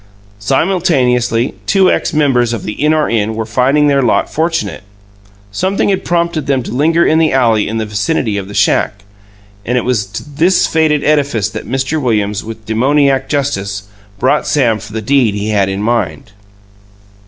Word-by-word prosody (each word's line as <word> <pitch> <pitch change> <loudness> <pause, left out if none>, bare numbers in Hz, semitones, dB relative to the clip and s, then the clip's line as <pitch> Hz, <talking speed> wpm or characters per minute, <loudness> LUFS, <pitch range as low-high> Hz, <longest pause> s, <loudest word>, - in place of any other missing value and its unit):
Simultaneously, 130 - +1
two 190 -2 +4
ex - - -1
members 130 -7 +1
of 110 - -4
the - - -4
In 150 +8 0
Or 155 -1 +1
In 110 -1 -1
were 110 0 -3
finding 130 +6 +2
their 140 -1 +3
lot 125 - 0
fortunate. 160 +1 -1 0.7
Something 190 - 0
had 190 -1 0
prompted 170 -4 -1
them 135 -3 +1
to - - -7
linger 165 +7 +2
in 160 - +3
the 160 -1 +2
alley 115 -5 +2
in 110 - -3
the 110 - -2
vicinity 105 +2 -1
of 100 -2 -4
the 100 - -9
shack, 105 0 +1 0.6
and 125 +4 -1
it 125 - -1
was 115 -6 0
to 100 - -7
this 160 +6 +2
fated 155 -2 +1
edifice 140 -9 +1
that - - -7
Mr. 135 +4 -1
Williams, 105 -5 -1
with 110 -1 -9
demoniac 135 +4 +1
justice, 100 -9 -2 0.3
brought 130 +7 +1
Sam 120 -7 +1
for 100 - -11
the 110 0 -5
deed 125 -4 +2
he 105 +1 -3
had 100 -2 +1
in 95 +1 -3
mind. 115 -1 -2
125 Hz, 175 wpm, -14 LUFS, 110-150 Hz, 0.7 s, two